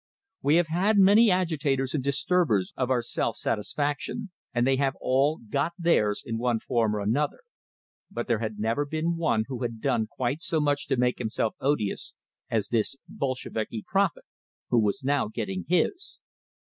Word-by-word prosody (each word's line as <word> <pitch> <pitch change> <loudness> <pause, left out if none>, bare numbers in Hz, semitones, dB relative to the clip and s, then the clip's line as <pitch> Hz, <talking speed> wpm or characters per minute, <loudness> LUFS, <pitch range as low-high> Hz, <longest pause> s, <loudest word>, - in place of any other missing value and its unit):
We 145 +3 +3
have 175 0 +4
had 195 +6 +2
many 205 +4 +7
agitators 150 -8 0
and 145 -4 -1
disturbers 140 - +1
of 130 -1 -1
our 125 -2 +2
self - - -2
satisfaction, 145 - -2 0.2
and 120 -1 +1
they 135 0 +3
have 135 0 +1
all 140 +4 +2
"got 140 +8 0
theirs," 135 - +2
in 115 0 -3
one 120 -1 +1
form 115 -3 0
or 105 - -2
another; 125 - 0 0.7
but - - -4
there 115 -4 +1
had 110 -2 -4
never 115 +7 0
been 160 +3 -1
one 155 -10 +1
who 130 -3 -5
had 115 -2 -3
done 115 -4 0
quite 130 +6 -2
so 160 - 0
much 145 -1 0
to 135 - +1
make 125 0 +1
himself 110 -1 -1
odious 125 -8 -1 0.3
as 110 -3 0
this 115 +2 +1
"Bolsheviki 115 -5 -3
prophet," 195 -3 +1 0.5
who 120 - +5
was 110 +5 0
now 140 -1 +1
"getting 100 -4 -4
his." 180 - 0
135 Hz, 170 wpm, -27 LUFS, 115-155 Hz, 0.7 s, many